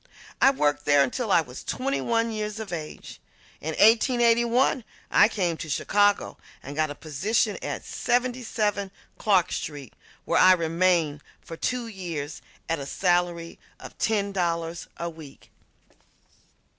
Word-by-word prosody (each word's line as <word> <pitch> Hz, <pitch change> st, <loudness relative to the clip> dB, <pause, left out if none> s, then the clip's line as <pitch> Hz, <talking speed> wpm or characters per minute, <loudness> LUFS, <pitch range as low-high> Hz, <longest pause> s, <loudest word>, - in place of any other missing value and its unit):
I 270 Hz, -, +8 dB
worked 145 Hz, -, 0 dB
there 145 Hz, -1 st, +5 dB
until 205 Hz, -, -2 dB
I 175 Hz, -, +5 dB
was 130 Hz, -5 st, -10 dB
twenty 275 Hz, +2 st, -2 dB
one 230 Hz, 0 st, 0 dB
years 215 Hz, 0 st, -4 dB
of 215 Hz, -5 st, -6 dB
age. 155 Hz, -3 st, -7 dB, 0.4 s
In 160 Hz, +1 st, -3 dB
1881 235 Hz, +2 st, +4 dB, 0.3 s
I -, -, +6 dB
came 180 Hz, -7 st, -1 dB
to 155 Hz, -, -7 dB
Chicago 205 Hz, +7 st, +1 dB, 0.2 s
and 140 Hz, +2 st, -8 dB
got 155 Hz, 0 st, +1 dB
a 145 Hz, -, -6 dB
position 200 Hz, -, 0 dB
at -, -, -4 dB
77 235 Hz, -5 st, -1 dB, 0.3 s
Clark 190 Hz, -4 st, +3 dB
Street, 145 Hz, -5 st, -5 dB, 0.3 s
where -, -, +2 dB
I 185 Hz, 0 st, +8 dB
remained 165 Hz, -3 st, +1 dB, 0.2 s
for 165 Hz, -, -9 dB
two 250 Hz, +7 st, -2 dB
years 170 Hz, -9 st, -6 dB, 0.3 s
at 165 Hz, -1 st, -1 dB
a 140 Hz, -, -6 dB
salary 175 Hz, -1 st, 0 dB, 0.2 s
of -, -, -11 dB
ten 205 Hz, -3 st, 0 dB
dollars 170 Hz, -2 st, -2 dB
a 170 Hz, -, -3 dB
week. 160 Hz, -4 st, -12 dB
185 Hz, 140 wpm, -26 LUFS, 160-225 Hz, 0.4 s, I